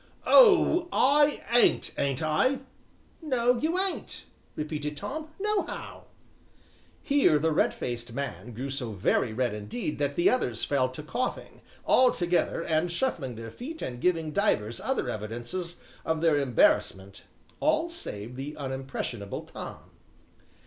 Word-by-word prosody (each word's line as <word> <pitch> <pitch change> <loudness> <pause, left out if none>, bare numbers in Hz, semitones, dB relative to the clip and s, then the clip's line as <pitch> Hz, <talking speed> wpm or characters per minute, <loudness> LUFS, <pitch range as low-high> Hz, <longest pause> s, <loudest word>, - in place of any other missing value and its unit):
"Oh! 380 -7 +6
I 290 +2 +3
ain't, 240 0 +4
ain't 140 +1 -1
I?" 255 - +1 0.6
"No, 250 -5 +1
you 320 +6 0
ain't," 385 0 -2 0.3
repeated 150 -1 -4
Tom, 310 - -5
"nohow." 420 0 -3 1.0
Here 280 - +4
the 160 +2 +1
red 155 - +3
faced 120 -1 -5
man 130 -1 -5
grew 135 +4 -4
so 125 -5 -3
very 105 +4 +1
red 120 0 -1
indeed 105 +8 -4
that 145 -1 -1
the 175 - +3
others 125 - +1
fell 130 -3 +1
to 130 +4 -8
coughing, 250 +11 -4 0.2
all 255 0 +5
together, 175 -3 0
and 160 +2 0
shuffling 170 - -1
their 115 0 -8
feet 315 - -7
and 120 -1 -5
giving 165 -4 +1
divers 115 - 0
other 265 - -1
evidences 120 - -4 0.3
of 160 -1 -1
their 160 -3 +3
embarrassment, 100 -6 +1 0.3
all 310 +2 +2
save 125 - -5
the 140 +3 -6
unimpressionable 130 -6 -5
Tom. - - -10
155 Hz, 135 wpm, -28 LUFS, -, 1.0 s, Oh